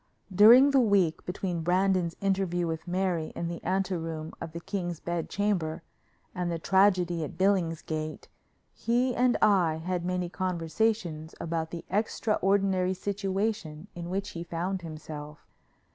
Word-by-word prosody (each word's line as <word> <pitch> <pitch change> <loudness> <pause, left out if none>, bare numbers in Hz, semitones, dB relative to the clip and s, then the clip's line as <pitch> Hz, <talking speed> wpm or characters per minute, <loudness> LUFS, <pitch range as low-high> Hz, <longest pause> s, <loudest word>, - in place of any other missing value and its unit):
During 235 +8 +8
the 275 - +5
week, 200 -8 +2
between 180 -2 -2
Brandon's 180 0 +1
interview 190 -3 0
with 160 +1 -4
Mary 180 -3 -1
in 170 - -3
the 170 - -6
ante 190 0 0
room 160 -1 -5
of 160 - -5
the 170 - -6
king's 175 -2 -4
bed 170 -1 -3
chamber 180 -6 -1 0.5
and 180 -1 -2
the 170 - -1
tragedy 180 -2 +3
at 155 - -7
Billingsgate, 165 -5 -1 0.5
he 245 +2 +1
and 245 +1 +2
I 185 -7 +4
had 175 +2 -3
many 180 0 -1
conversations 175 -2 -1
about 165 -1 -2
the 170 0 -7
extraordinary 195 -3 +1
situation 195 -3 -3
in 170 0 -6
which 195 +2 -2
he 170 - -6
found 175 +3 -3
himself. 155 -2 -8
180 Hz, 140 wpm, -28 LUFS, 165-195 Hz, 0.5 s, During